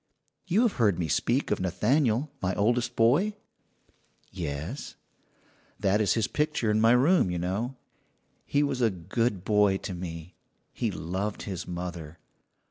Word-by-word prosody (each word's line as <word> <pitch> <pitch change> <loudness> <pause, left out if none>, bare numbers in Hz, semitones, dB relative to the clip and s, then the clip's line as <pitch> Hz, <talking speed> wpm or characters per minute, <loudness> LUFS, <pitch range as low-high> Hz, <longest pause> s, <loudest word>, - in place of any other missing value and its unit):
You 195 +7 +3
have 235 - +1
heard 105 -7 +3
me 85 - -1
speak 70 - 0
of - - +1
Nathaniel, 115 - +1
my 90 0 0
oldest 120 +3 +1
boy?" 145 - +3 1.0
"Yes." 75 -5 -5 0.8
"That 100 +2 +2
is 105 - +2
his 115 -2 +1
picture 150 -7 0
in 110 +1 +2
my 115 +1 +6
room, 140 - +4
you 90 - -2
know. 100 +9 -2 0.7
He 145 +1 +2
was 135 -3 -1
a 115 - +4
good 100 +2 -2
boy 105 -2 +3
to 95 - -6
me. 85 -1 -7 0.4
He - - -1
loved 95 +5 -3
his 95 -3 -5
mother. 85 -3 -6
105 Hz, 145 wpm, -28 LUFS, 90-125 Hz, 1.0 s, my